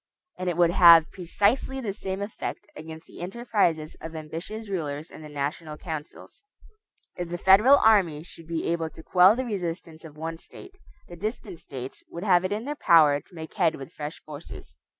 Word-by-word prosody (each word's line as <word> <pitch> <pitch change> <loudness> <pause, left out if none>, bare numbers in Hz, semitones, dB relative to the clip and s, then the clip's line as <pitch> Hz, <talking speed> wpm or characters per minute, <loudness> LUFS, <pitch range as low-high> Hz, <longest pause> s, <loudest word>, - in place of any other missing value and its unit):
And 185 0 -1
it 175 - -3
would 170 -1 +4
have 170 -3 +7
precisely 205 +9 0
the 215 -6 -3
same 190 -1 -4
effect 205 - -6
against 160 +1 -10
the - - -13
enterprises 180 -6 -1
of 160 +1 -8
ambitious 165 +8 -7
rulers 155 -5 -4
in - - -11
the 155 - -10
national 150 +2 -4
councils. 155 -3 -8 0.7
If 175 -1 -5
the 175 - -3
federal 210 +10 +6
army 185 - +3
should 165 -1 -14
be 165 -1 -3
able 165 -1 -1
to 160 - -14
quell 185 +5 +6
the 260 +1 -2
resistance 170 -6 -5
of 155 -2 -12
one 165 +1 -5
State, 380 - -13 0.3
the 175 - -10
distant 200 -1 -5
States 130 -1 -8
would 170 - -7
have 180 -3 +4
it 185 - -2
in 215 +3 -3
their 290 - -2
power 155 - +5
to 185 - -21
make 160 -1 -8
head 160 - +2
with 135 - -10
fresh 150 +1 -7
forces. 145 - -10
170 Hz, 190 wpm, -26 LUFS, 160-195 Hz, 0.7 s, have